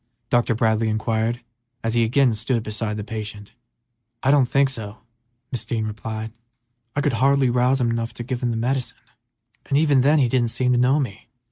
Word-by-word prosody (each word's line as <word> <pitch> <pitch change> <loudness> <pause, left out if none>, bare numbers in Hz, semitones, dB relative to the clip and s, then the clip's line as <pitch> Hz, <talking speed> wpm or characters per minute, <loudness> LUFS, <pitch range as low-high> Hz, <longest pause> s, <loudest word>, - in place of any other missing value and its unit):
Dr. 120 -1 +2
Bradley 110 0 +1
inquired, 110 +2 -1 0.4
as 115 0 0
he 120 -1 +3
again 125 +2 +3
stood 115 +1 -1
beside 110 0 -3
the 105 - -4
patient. 105 -1 -7 0.7
"I 135 - +4
don't 140 -3 +4
think 140 0 +3
so," 110 -5 -6 0.6
Mrs. 125 - -3
Dean 110 -2 -1
replied. 110 +1 -5 0.6
"I 145 - +1
could 145 -2 +1
hardly 135 +2 +3
rouse 125 +2 +2
him 120 -2 +1
enough 115 0 -2
to 120 - -5
give 120 0 -4
him 125 - 0
the 115 - -1
medicine, 125 +2 -1 0.7
and 140 - +2
even 145 -3 +4
then 145 +4 +4
he 135 -4 +4
didn't 120 0 +1
seem 125 +2 +1
to 125 - +3
know 130 +4 +3
me." 115 -7 -5
120 Hz, 195 wpm, -22 LUFS, 110-130 Hz, 0.7 s, I